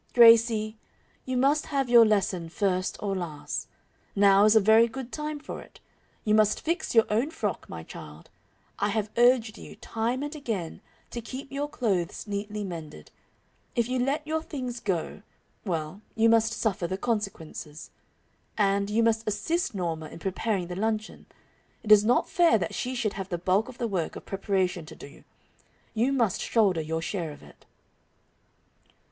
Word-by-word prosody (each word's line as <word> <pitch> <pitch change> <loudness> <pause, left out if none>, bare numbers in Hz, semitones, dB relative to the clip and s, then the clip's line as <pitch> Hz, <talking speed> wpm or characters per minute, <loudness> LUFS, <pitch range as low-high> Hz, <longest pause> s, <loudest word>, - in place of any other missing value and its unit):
"Gracie, 230 -2 +6 0.5
you 255 -1 -2
must 280 +4 +2
have 275 -3 0
your 240 -1 +8
lesson 185 -5 0
first 185 0 -1
or 200 -1 -1
last. 165 -5 -4 0.5
Now 200 0 +6
is 215 +1 +5
a - - +8
very 220 +3 +6
good 255 +1 -7
time 300 0 -4
for - - -7
it. - - -16 0.5
You 210 - +2
must 215 -1 +3
fix 340 -2 -2
your 225 - +7
own 235 +8 +1
frock, 215 - -4
my 80 - -7
child. 75 0 -11 0.5
I 205 - +1
have 215 0 -1
urged 240 -2 +3
you, - - -11
time 235 +4 -2
and 290 +1 -5
again, 220 - -4 0.3
to 235 - -4
keep 260 +4 -8
your 285 +1 -3
clothes 195 - -1
neatly 205 0 -4
mended. 160 - -8 0.6
If 235 -1 +1
you 255 0 -1
let 280 +4 0
your 315 +1 -1
things 255 -6 -5
go 190 -2 -3 0.4
well, 165 +1 -3
you 225 0 +4
must 225 0 +3
suffer 195 -6 -1
the 190 +2 -3
consequences. 185 -8 -4 0.7
And, 200 -1 +2
you 225 +2 +2
must 225 -1 +1
assist 215 - -1
Norma 165 -4 -3
in - - -10
preparing 190 +2 -2
the 180 +1 -6
luncheon. 215 +2 -3 0.6
It 215 - -1
is 210 -1 +9
not 240 +3 +3
fair 340 -9 +4
that 180 - -3
she 255 +1 -3
should 220 -4 -1
have 195 -1 -6
the 175 - -2
bulk 190 +7 +1
of 255 - -11
the 240 - -1
work 185 -6 -2
of - - -9
preparation 190 -3 -1
to 160 - -10
do. 140 - -13 0.7
You 235 +4 +1
must 235 -8 +1
shoulder 195 -8 +2
your 160 +1 -3
share 170 -2 -3
of 145 - -13
it." - - -18
215 Hz, 170 wpm, -27 LUFS, 185-240 Hz, 0.7 s, is